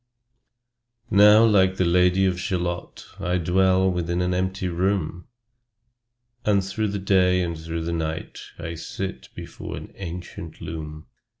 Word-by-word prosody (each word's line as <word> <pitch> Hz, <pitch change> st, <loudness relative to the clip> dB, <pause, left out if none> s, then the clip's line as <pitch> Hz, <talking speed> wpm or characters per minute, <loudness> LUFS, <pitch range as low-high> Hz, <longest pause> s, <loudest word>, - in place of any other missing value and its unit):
Now 105 Hz, +2 st, +7 dB
like 95 Hz, -4 st, +4 dB
the 95 Hz, -, +1 dB
Lady 90 Hz, +2 st, +3 dB
of 90 Hz, -1 st, 0 dB
Shalott, 90 Hz, -1 st, -3 dB
I 90 Hz, -1 st, 0 dB
dwell 95 Hz, +2 st, +3 dB
within 85 Hz, 0 st, -1 dB
an 90 Hz, 0 st, 0 dB
empty 95 Hz, +1 st, -1 dB
room, 90 Hz, -1 st, -1 dB, 1.2 s
And 100 Hz, -2 st, +2 dB
through 105 Hz, +3 st, -1 dB
the 100 Hz, 0 st, -2 dB
day 90 Hz, -2 st, +3 dB
and 85 Hz, -1 st, -3 dB
through 80 Hz, +1 st, -5 dB
the 85 Hz, +1 st, -2 dB
night 80 Hz, -1 st, -4 dB, 0.2 s
I 85 Hz, 0 st, -5 dB
sit 95 Hz, +3 st, -6 dB
before -, -, -7 dB
an -, -, -9 dB
ancient 85 Hz, -3 st, -8 dB
loom. 75 Hz, -1 st, -7 dB
90 Hz, 135 wpm, -24 LUFS, 85-95 Hz, 1.2 s, Now